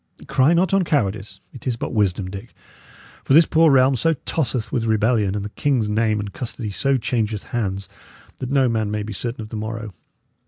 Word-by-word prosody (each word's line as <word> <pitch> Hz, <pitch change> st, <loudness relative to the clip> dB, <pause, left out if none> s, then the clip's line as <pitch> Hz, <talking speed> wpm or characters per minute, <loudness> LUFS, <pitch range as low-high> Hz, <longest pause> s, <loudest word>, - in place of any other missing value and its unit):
Cry 135 Hz, +6 st, +3 dB
not 180 Hz, +2 st, +2 dB
on 195 Hz, -1 st, +4 dB
cowardice; 100 Hz, -, -1 dB
it 130 Hz, 0 st, -9 dB
is 125 Hz, -, +1 dB
but 115 Hz, -, -5 dB
wisdom, 100 Hz, -3 st, +1 dB
Dick; 100 Hz, +4 st, -9 dB, 0.7 s
for 135 Hz, -, +3 dB
this 165 Hz, +1 st, +8 dB
poor 160 Hz, +1 st, +4 dB
realm 135 Hz, -1 st, +5 dB
so 165 Hz, +6 st, +1 dB
tosseth 125 Hz, -7 st, -1 dB
with 115 Hz, -3 st, -1 dB
rebellion, 110 Hz, -2 st, +2 dB
and 100 Hz, -1 st, -3 dB
the -, -, -5 dB
king's 120 Hz, -2 st, 0 dB
name 110 Hz, 0 st, +1 dB
and 100 Hz, -1 st, -5 dB
custody 115 Hz, -3 st, -4 dB
so 135 Hz, +9 st, +1 dB
changeth 110 Hz, -4 st, -2 dB
hands, 100 Hz, -4 st, -3 dB, 0.5 s
that 130 Hz, -, -4 dB
no 135 Hz, -1 st, +3 dB
man 110 Hz, -3 st, 0 dB
may 105 Hz, 0 st, -2 dB
be 110 Hz, 0 st, -6 dB
certain 115 Hz, +4 st, -4 dB
of 105 Hz, -, -10 dB
the 110 Hz, -, -5 dB
morrow. 110 Hz, -1 st, -5 dB
115 Hz, 200 wpm, -21 LUFS, 105-130 Hz, 0.7 s, this